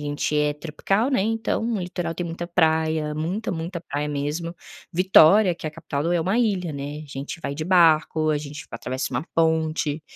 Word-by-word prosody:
gente 145 +1 -2
é 150 0 +2
tropical, 195 - -1
né, 260 - +2
então 225 +1 -1
o 210 - -1
litoral 175 -2 -3
tem 175 - -3
muita 170 +1 -5
praia, 160 -3 +1
muita, 180 +9 -2
muita 170 0 -4
praia 145 -2 -3
mesmo. 150 +4 -3 0.4
Vitória, 185 +2 +6
que 165 - -8
é - - 0
a - - -7
capital 155 -3 -4
do 170 +3 0
é 175 - +2
uma 190 +8 +1
ilha, 195 -8 0
né, 145 +2 -6
a - - -12
gente 140 +5 -6
vai 140 - -4
de 155 +2 -4
barco, 160 -3 +4
a 150 - +1
gente 150 +1 -8
atravessa 130 +1 -4
uma 125 +4 -1
ponte. 160 -2 +1
160 Hz, 200 wpm, -24 LUFS, 150-175 Hz, 0.4 s, Vitória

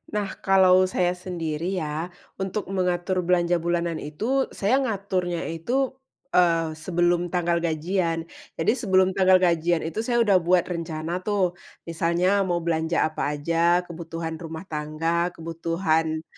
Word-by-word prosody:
Nah, 205 -2 -3
kalau 185 -1 +5
saya 180 -1 +1
sendiri 175 -1 -4
ya, 155 +3 -3 0.3
untuk 190 +2 -2
mengatur 185 0 0
belanja 175 -1 +2
bulanan 170 -1 -1
itu 225 - -1
saya 225 +7 +2
ngaturnya 190 -8 -2
itu, 245 +12 -1 0.4
eee, 165 -2 +3
sebelum 175 +1 +1
tanggal 175 -1 0
gajian. 165 +1 -1 0.3
Jadi, 160 - +2
sebelum 190 -6 +2
tanggal 190 -1 +4
gajian 175 -2 +2
itu 165 +6 -4
saya 235 +1 +2
udah 200 -4 +4
buat 175 0 +3
rencana 170 -1 -4
tuh, 185 -3 -1 0.2
misalnya 170 +4 +1
mau 175 -2 -1
belanja 165 0 +1
apa 150 -2 -1
aja, 170 +4 +2
kebutuhan 165 -1 -6
rumah 160 0 -7
tangga, 160 +3 -1
kebutuhan 165 -1 -1
175 Hz, 130 wpm, -25 LUFS, 165-185 Hz, 0.4 s, kalau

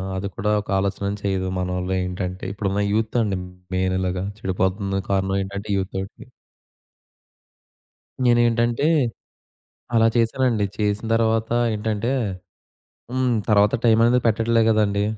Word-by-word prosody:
అది 95 +1 -3
కూడా 105 +2 -1
ఒక 105 - -17
ఆలోచన 100 +1 -1 0.2
చేయదు 95 -2 -1
మనోళ్ళేంటంటే, 90 0 -2
ఇప్పుడున్న 100 -1 -1
యూత్ 110 +2 0
అండి 100 -3 -1 0.4
మెయిన్ 95 0 +1
ఇలాగా 90 0 -2 0.2
చెడిపోతుందొ 95 +1 -1
కారణం 95 0 +1
ఏంటంటే 100 +2 -6
యూత్‌తోటి. 95 0 -5 2.0
నేనేంటంటే 120 +2 +3 1.1
అలా 115 0 +5
చేశానండి. 115 -2 +2
చేసిన 105 +1 -1
తర్వాత 115 0 +1 0.2
ఏంటంటే 110 +3 -1 1.0
హ్మ్. 130 -1 +1 0.2
తర్వాత 105 0 +4
టై‌మనేది 115 +2 +4
పెట్టట్లే 115 +1 +2
గదండీ! 105 -2 +2
105 Hz, 105 wpm, -22 LUFS, 95-115 Hz, 2.0 s, అలా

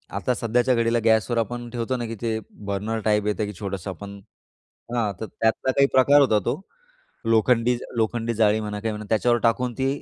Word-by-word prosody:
आता 125 - 0
सध्याच्या 120 +3 +1
घडीला 115 0 +2
गॅसवर 110 +1 +3
आपण 120 +1 -2
ठेवतो 120 +1 -2
ना 120 - -3
की 115 - -5
ते 110 -2 -1 0.3
बर्नर 105 +3 -2
टाइप 105 -1 +2
येतं 105 0 0
की 105 - -6
छोटंसं 100 -2 -4
आपण, 100 +2 -9 0.7
हां, 110 -4 0
तर - - -3
त्यातला 110 +5 0
काही 140 +1 +4
प्रकार 140 +2 +6
होता. 110 -6 +4
तो - - -1 0.7
लोखंडी 115 +2 +3 0.2
लोखंडी 115 +1 0
जाळी 110 -1 +3
म्हणा 105 -1 -4
काही 110 -1 -1
म्हणा 105 0 -7
त्याच्यावर 120 +2 +2
टाकून 120 +1 +1
ती 135 +2 0
115 Hz, 185 wpm, -24 LUFS, 105-120 Hz, 0.7 s, प्रकार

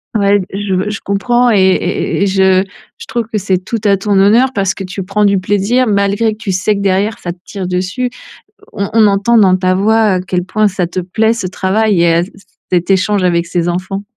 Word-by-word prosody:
Ouais 200 -1 +3
d 190 - -5
je 195 0 -2
je 215 - -4
comprends 240 +5 +1
et 215 - +3
et 190 0 0
et 200 - +2
et - - +2
je 190 -1 +3 0.3
je 460 - -10
trouve 235 - -3
que 215 - -1
c'est 190 -2 0
tout 230 +4 -3
à 200 - +4
ton 200 +2 -2
honneur 225 +7 +4
parce 195 -2 0
que 195 - -7
tu 190 +1 -6
prends 205 +3 -1
du 200 -1 +3
plaisir, 205 +7 +1
malgré 200 +1 +1
que 215 - -13
tu 215 -3 -4
sais 185 +3 0
que 200 - -4
derrière 200 +3 0
ça 175 - -5
te 175 - -11
tire 195 -3 -6
dessus. 185 +8 -2 0.6
On 200 -2 -3
on 220 -1 +5
entend 205 +4 +2
dans 185 -3 +4
ta 185 0 +1
voix 220 +4 +2
à 195 -5 +2
quel 180 -1 -3
point 215 +2 +1
ça 180 -3 -2
te 185 +1 -4
plaît, 220 +5 0
ce 230 -5 -4
travail, 195 +1 0
et 170 -1 +3
à 170 +1 +2
c 190 - -10
c 195 - -19 0.3
cet 180 0 0
échange 195 0 +1
avec 170 -1 +1
ces 175 0 -2
enfants. 185 +3 -3
195 Hz, 240 wpm, -14 LUFS, 185-215 Hz, 0.6 s, on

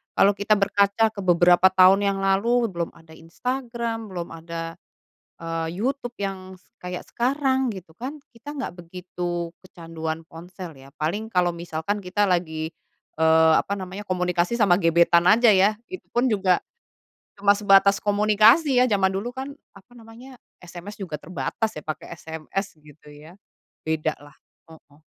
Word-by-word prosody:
Kalau 200 - +5
kita 205 +1 +1
berkaca 200 +2 +2
ke 215 - -10
beberapa 175 0 +5
tahun 190 +2 +5
yang 200 0 0
lalu 225 +4 +2
belum 170 -2 -4
ada 165 -1 -19
Instagram, 230 +6 -4
belum 175 -3 -6
ada, 165 0 -7 0.6
eee, 165 -1 -3 0.2
YouTube 250 -2 -3
yang 190 -1 -5
s 180 - -27
kayak 180 0 -6
sekarang 265 +1 +1
gitu 180 -3 -11
kan, 260 - -7
kita 280 +5 -10
gak 275 - -4
begitu 175 -1 -5
kecanduan 165 -3 -6
ponsel 175 +2 -10
ya, 135 0 -15
paling 185 +9 -2
kalau 180 -5 +1
misalkan 170 +3 -4
kita 195 +2 -1
lagi, 165 -4 -1 0.5
eee, 160 0 +5
apa 200 - -3
namanya 195 +1 -7
komunikasi 180 +2 0
sama 200 -6 +3
gebetan 170 0 +4
aja 225 +3 +6
ya, 200 +2 +4 0.2
itu 370 - -8
pun 245 +2 +1
juga 190 -4 +2 0.8
cuma 200 0 +4
sebatas 200 -1 +4
komunikasi 215 +7 +4
ya, - - +4
zaman 195 -2 +2
dulu 205 +5 -3
kan 265 +1 -5 0.2
apa 200 +5 -18
namanya, 235 +3 -13 0.2
SMS 175 +3 -10
juga 185 -6 -7
terbatas 180 +7 -3
ya 150 - -9
pakai 155 - -6
SMS 160 +5 -5
gitu 150 0 -19
ya. 155 +6 -15 0.5
Bedalah, 155 -2 -3 0.3
heeh. 155 -3 -18
190 Hz, 150 wpm, -24 LUFS, 170-215 Hz, 0.8 s, aja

